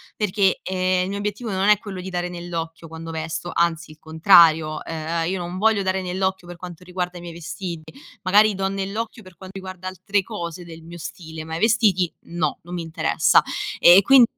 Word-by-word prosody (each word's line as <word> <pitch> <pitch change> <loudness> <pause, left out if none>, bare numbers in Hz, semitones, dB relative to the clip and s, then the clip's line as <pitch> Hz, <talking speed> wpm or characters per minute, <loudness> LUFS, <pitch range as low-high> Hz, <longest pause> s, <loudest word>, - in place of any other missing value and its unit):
perché, 200 -2 +1
ehm, 185 0 +1
il 185 - -3
mio 200 - -3
obiettivo 210 +3 -3
non 190 +1 0
è 210 - +6
quello 195 -4 -7
di 185 - -6
dare 180 -1 -2
nell'occhio 170 -2 -6
quando 165 +1 -8
vesto, 160 +2 -4
anzi 170 -1 0
il 155 - -16
contrario, 160 -1 +5
ehm, 165 +1 -2
io 190 - -1
non 175 +1 -5
voglio 210 0 +3
dare 190 0 0
nell'occhio 185 0 -2
per 175 - -8
quanto 180 0 -10
riguarda 180 0 -4
i - - -9
miei 170 -1 -8
vestiti. 170 -1 -7 0.3
Magari 205 +2 +4
do 195 0 -1
nell'occhio 200 +4 -4
per 185 -4 -15
quanto 190 0 -10
riguarda 185 -1 -7
altre 195 +2 -1
cose 170 0 -6
del 165 -1 -11
mio 170 +1 -10
stile, 160 -2 -8
ma 160 0 -5
i - - -5
vestiti 210 -5 +3 0.2
no, 175 +1 -2
non 175 +2 -10
mi 175 - -3
interessa. 160 -1 +3 0.4
E 175 +3 +8
quin 265 +3 +7
180 Hz, 200 wpm, -22 LUFS, 165-190 Hz, 0.4 s, E